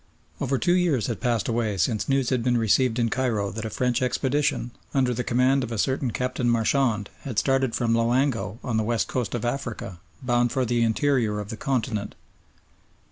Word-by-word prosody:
Over 135 0 0
two 175 +6 +2
years 170 - +2
had 115 - -4
passed 120 -5 0
away 115 -3 -1
since 105 +8 0
news 135 -2 +1
had 125 -2 +1
been 125 -1 +2
received 115 +2 +2
in 115 -1 +1
Cairo 110 -7 0
that 110 +3 -5
a - - -2
French 125 +3 0
expedition, 130 -1 0 0.2
under 130 -2 +2
the 125 +1 -2
command 130 +3 +2
of 120 - -5
a 115 - -3
certain 130 +4 0
Captain 125 +1 -1
Marchand, 115 -2 +1
had 125 -6 -7
started 135 -2 +2
from 115 -1 +1
Loango, 115 -3 +1
on 120 -4 -1
the 110 - +1
West 115 0 0
Coast 125 -3 -2
of 120 - -3
Africa, 120 -8 -4 0.2
bound 120 -1 +2
for 130 -1 0
the 120 0 +1
interior 115 -2 +1
of 105 -1 -6
the 115 - -4
continent. 115 -6 -2
120 Hz, 190 wpm, -25 LUFS, 110-130 Hz, 0.2 s, two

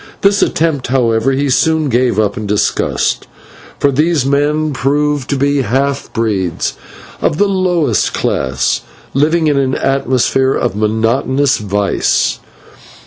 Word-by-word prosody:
This 200 +1 +3
attempt, 155 -4 0
however, 120 -1 +1
he 140 +2 0
soon 155 +3 +2
gave 125 -4 +1
up 105 -2 +1
in 105 -1 -5
disgust, 105 0 0 0.5
for 140 - +2
these 150 0 +1
men 145 +2 +1
proved 145 +1 0
to 140 - 0
be 140 +1 +1
half 135 +4 -1
breeds 105 -7 -1 0.5
of 150 - 0
the 205 - +3
lowest 185 -5 +1
class, 65 -1 -1 0.3
living 160 +4 +2
in 145 -2 +2
an 130 -1 0
atmosphere 135 0 +1
of - - -1
monotonous 115 +6 +1
vice. 100 -1 0
135 Hz, 130 wpm, -14 LUFS, 115-150 Hz, 0.5 s, This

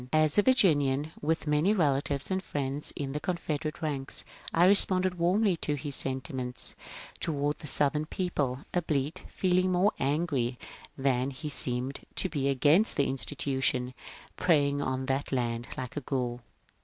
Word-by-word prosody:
As 155 -1 +3
a 205 - +6
Virginian, 155 - +3
with 160 +2 0
many 150 +8 +2
relatives 140 -3 0
and 190 0 -1
friends 140 -2 -3
in 140 -2 -4
the 150 - -3
Confeder 160 -3 -2
ate 155 +2 -7
ranks, 140 -3 0 0.3
I 170 +2 +4
responded 185 -2 +4
warmly 185 +3 +3
to 150 -2 -2
his 145 -1 -3
sentiments 130 -2 0 0.5
toward 145 -2 -1
the 150 - -8
Southern 150 +2 +1
people, 145 -8 -2
albeit 155 -4 -1
feeling 185 0 +1
more 185 +4 +3
angry 135 -4 0 0.4
than 130 -1 +1
he 150 +3 -6
seemed 130 -1 -1 0.2
to 190 - +4
be 140 -4 -1
against 150 - +3
the 140 - +3
institution 130 0 -1 0.4
preying 145 -5 +2
on 130 -1 -2
that 135 +2 -2
land 120 -2 -1
like 130 -1 -5
a 145 - -3
ghoul. 125 -2 -2
145 Hz, 150 wpm, -29 LUFS, 135-170 Hz, 0.5 s, a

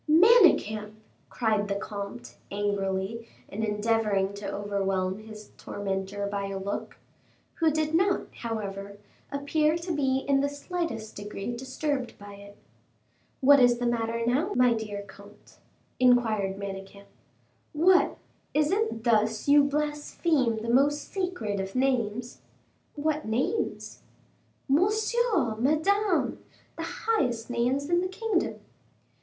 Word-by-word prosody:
'" - - -18
"Manicamp!" 305 - +5 0.4
cried 215 -3 0
the 200 - -1
comte, 200 - -6
angrily, 200 +2 -2 0.2
and 220 +2 -4
endeavoring 210 -2 +1
to 200 0 -5
overwhelm 195 -1 -1
his 215 -1 -11
tormentor 195 0 -3
by 200 0 -3
a 195 0 -4
look, 195 +1 -5 0.6
who 325 -1 +4
did 310 0 -1
not, 380 +3 +3 0.2
however, 200 -3 -5 0.3
appear 300 +3 +1
to 345 +1 -5
be 270 -2 0
in 275 -1 +4
the 285 - +1
slightest 285 - -4
degree 205 +3 -5
disturbed 260 +1 -3
by 205 0 -11
it. 200 0 -13 0.8
"What 280 +1 +7
is 245 -1 +5
the 245 - -2
matter 230 -1 0
now, 290 - +1
my 250 -1 +5
dear 210 -3 -4
comte?" 200 +1 -16 0.4
inquired 225 -6 +3
Manicamp. 200 0 -7 0.7
"What! 360 +5 +4 0.4
is 300 0 +3
it 400 - 0
thus 220 0 +2
you 290 0 +7
blaspheme 295 -4 0
the 230 - -3
most 285 +4 +2
sacred 360 - -2
of 190 +3 -5
names?" 245 -3 -1 0.5
"What 305 +1 -1
names?" 260 - -2 0.7
"Monsieur! 415 - +2
Madame! 345 - +1 0.3
the - - -5 0.2
highest 245 - 0
names 250 +4 0
in 345 +1 +2
the 370 - -1
kingdom." 390 0 -2
235 Hz, 125 wpm, -27 LUFS, 205-300 Hz, 0.8 s, What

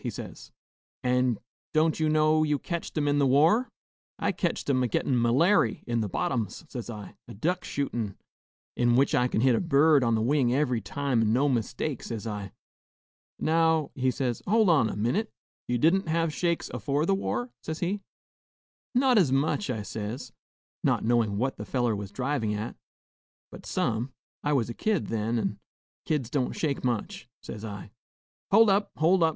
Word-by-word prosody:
he - - -3
says; - - -8 0.5
'an' 125 -2 +2 0.4
don't 155 +1 +3
you 155 -1 +2
know 155 0 +3
you 150 -2 +2
ketched 170 +1 -5
'em 145 -1 +1
in 145 0 +2
the 140 - +4
war?' 160 - +4 0.5
'I - - 0
ketched - - -2
'em 130 -2 +2
a 125 - +2
gettin' 125 +3 0
m'lairy 125 - +3
in 120 -1 0
the 105 - -2
bottoms,' 115 - -2
says 120 -5 -7
I, 105 -4 -8
'a - - -10
duck 175 - -1
shootin', 120 -8 -3 0.6
in 120 -1 +3
which 135 +2 +3
I 125 - +3
kin 110 - 0
hit 130 0 +4
a - - +2
bird 150 -3 +4
on 115 -1 +2
the 110 - 0
wing 130 -1 +2
every 125 -5 +1
time 130 +4 -1
an' 110 -1 +2
no 135 +4 +3
mistake,' 125 +2 -1
says 115 -2 -6
I. 105 -3 -5 0.9
'Now,' 160 -2 +2
he 130 -1 0
says, 125 -2 -2
'hold 215 0 +4
on 125 -9 +3
a - - -4
minute; 120 - 0 0.4
you 120 - +1
didn't 170 +8 +3
hev 165 -1 0
shakes 170 0 -1
afore 145 +1 0
the 195 - +2
war?' 120 - -2
says 160 0 -4
he. 190 +4 -2 0.9
'Not 255 -2 +5
as 160 -9 +3
much,' 145 +7 +1
I 110 -4 -2
says, 105 +5 -5 0.5
not - - +1
knowin' 115 -3 +2
what 130 +5 -1
the - - -5
feller 120 -4 0
was 100 -1 -6
drivin' 125 -2 -1
at, 110 +3 -4 0.8
'but - - -11
some; 115 +4 -1 0.3
I 150 - +1
was 125 -6 +1
a 120 - -5
kid 210 - -1
then, 115 +1 -1
and 115 - -2 0.5
kids 140 -6 -1
don't 140 -4 0
shake 145 -4 -2
much,' 120 0 -2 0.2
says 105 - -8
I. 105 -2 -7 0.6
'Hold 215 +1 +6
up! 200 +1 +2
hold 170 +4 +3
up!' 165 - +5
135 Hz, 185 wpm, -27 LUFS, 115-160 Hz, 0.9 s, Hold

